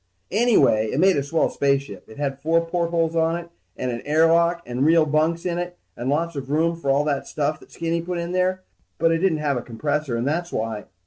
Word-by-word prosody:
Anyway, 210 - +3
it 135 - -1
made 190 +2 +5
a 140 - +1
swell 150 +4 +1
spaceship. 140 -3 -1
It 110 - -13
had 140 -1 -3
four 165 +3 +2
portholes 170 -1 0
on 165 0 +2
it 170 0 -6 0.3
and 125 - -2
an 120 - -4
air 155 +3 +3
lock 170 +1 +3
and 125 +2 -2
real 160 +1 +5
bunks 155 +3 0
in 175 -1 -1
it 175 0 -5 0.2
and 120 +2 -3
lots 165 +3 0
of 135 -1 -5
room 165 +3 +1
for 165 -4 -4
all 140 +2 +3
that 145 -2 -2
stuff 150 +1 -1
that - - -18
Skinny 165 0 -2
put 175 +1 -4
in 170 0 -3
there. 185 +1 0 0.3
But 165 0 +3
it 165 - +1
didn't 180 -3 +2
have 145 -3 0
a - - -2
compressor 145 +2 -2
and 120 +3 -1
that's 170 +4 -1
why 110 -1 -3
160 Hz, 235 wpm, -23 LUFS, 140-170 Hz, 0.3 s, made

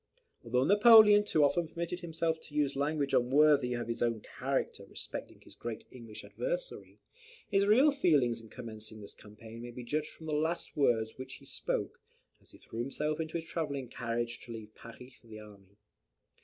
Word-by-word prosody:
Although 125 +1 +1
Napoleon 210 - +8
too 160 -7 +2
often 170 +3 +2
permitted 170 +2 -4
himself 165 -2 -2
to 150 - -15
use 145 -2 +1
language 145 0 -1
unworthy 135 0 +4
of 120 -1 -4
his 115 - -4
own 115 -2 0
character - - -3
respecting - - -8
his - - -15
great 115 -2 -6
English 115 -4 -10
adversary, - - -5 0.5
his 200 -1 +2
real 260 +8 +6
feelings 145 - +2
in 115 - -15
commencing 110 -3 -8
this 100 - -9
campaign 110 +2 -12
may 120 - -7
be 120 +1 -8
judged 150 +6 -2
from 160 - -13
the 155 - -3
last 160 +3 -1
words 115 -5 +1
which 130 0 -7
he - - -16
spoke, - - -3 0.4
as - - -19
he - - -14
threw 115 - -9
himself 150 +5 -2
into 160 +1 -3
his 165 - -6
travelling 140 -6 -3
carriage 120 0 -3
to 120 - -11
leave 110 -2 -9
Paris 125 +3 -13
for 125 - -23
the 110 -1 -10
army. 100 -2 -15
135 Hz, 185 wpm, -32 LUFS, 115-160 Hz, 0.5 s, Napoleon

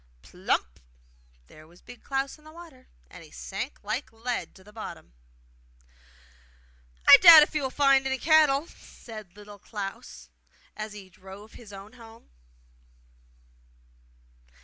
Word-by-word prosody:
Plump! - - -3 0.7
there 155 - -18
was 175 +2 -22
Big 245 - -14
Klaus 270 +2 -4
in - - -24
the 310 - -15
water, 320 -6 -15 0.2
and 180 - -13
he 155 - -16
sank 200 - -8
like 215 +7 -4
lead 235 +2 -5
to 190 - -18
the 210 +2 -18
bottom. 215 - -10 1.9
'I - - +11
doubt 335 -4 +10
if 300 - -4
he 305 - -1
will 265 - -2
find 275 -1 +2
any 265 0 -2
cattle!' 305 0 +3
said 215 - -14
Little 205 0 -14
Klaus 195 - -9 0.5
as 215 0 -7
he 195 -3 -13
drove 195 +4 -14
his 225 -4 -14
own 200 +3 -12
home. 230 -2 -17
225 Hz, 135 wpm, -26 LUFS, 195-275 Hz, 1.9 s, I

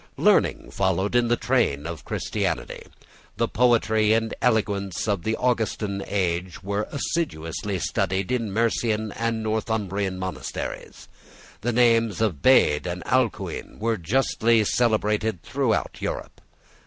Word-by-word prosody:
Learning - - +2
followed 95 +1 0
in 120 -1 +3
the 120 - +3
train 115 - +1
of 85 -2 -6
Christianity. - - -3 0.5
The - - +1
poetry 110 -3 +3
and 115 0 0
eloquence 100 -5 0
of 100 -4 0
the 110 +5 -1
Augustan 110 -5 -1
age 90 -2 -2
was 100 +2 -2
assiduously 100 - -2
studied 95 +2 -1
in 115 -5 -1
Mercian 110 0 0
and 115 0 -2
Northumbrian 105 -3 -1
monasteries. 95 -9 -6 0.5
The 120 +4 0
names 115 -2 +3
of 105 -10 0
Bede 90 - +4
and 90 0 -4
Alcuin - - -1
were 115 +1 0
justly 115 +3 +2
celebrated 105 -4 +1
throughout 125 -1 -1
Europe. - - -5
110 Hz, 120 wpm, -24 LUFS, 95-115 Hz, 0.5 s, Bede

